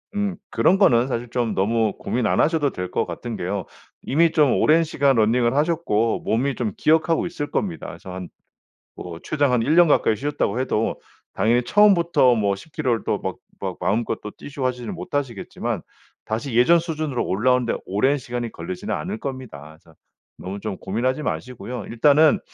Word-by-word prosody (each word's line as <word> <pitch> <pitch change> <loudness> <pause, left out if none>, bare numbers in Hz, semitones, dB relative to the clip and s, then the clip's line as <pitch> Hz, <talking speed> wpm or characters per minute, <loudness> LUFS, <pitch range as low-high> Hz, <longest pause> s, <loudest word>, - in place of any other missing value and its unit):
음 205 -2 -1
그런 190 - +3
거는 125 - +4
사실 120 -2 -3
좀 115 -2 -1
너무 110 +2 +1
고민 120 -2 -1
안 - - +1
하셔도 150 -3 +2
될 90 0 -5
것 - - 0
같은 120 -2 -6
게요. 95 0 -3 0.4
이미 165 +4 +3
좀 150 -5 +4
오랜 160 +2 +4
시간 140 -3 +2
러닝을 120 +2 +2
하셨고 145 -8 +1
몸이 130 +4 0
좀 115 -4 -2
기억하고 160 +1 +2
있을 155 -4 -4
겁니다. 180 -5 -2
그래서 95 - -9
한 90 -2 -7 0.6
뭐 85 -2 -8
최장 145 -4 +1
한 125 - +3
1 150 +7 +2
년 175 0 +7
가까이 110 -7 +3
쉬셨다고 130 -3 -1
해도 125 -4 -1 0.3
당연히 120 +3 +2
처음부터 170 - +4
뭐 100 -3 +1
10 160 - -14
킬로를 125 -8 0
또 - - 0
막 - - -4 0.3
막 - - -3
마음껏 110 +3 -1
또 105 - -6
뛰시고 140 +2 -6
하지는 125 -3 -2
못하시겠지만 135 -7 -4 0.4
다시 115 +4 -3
예전 125 +9 +6
수준으로 155 -6 -2
올라오는데 125 +4 +1
오랜 130 +9 +1
시간이 120 -3 -5
걸리지는 185 +3 -5
않을 205 +4 -4
겁니다. 110 - -7
자 80 - -20 0.5
너무 95 +2 -6
좀 105 -2 -5
고민하지 130 +8 -1
마시고요. 125 -4 -5
일단은 145 +6 +4
125 Hz, 365 characters per minute, -22 LUFS, 110-155 Hz, 0.6 s, 년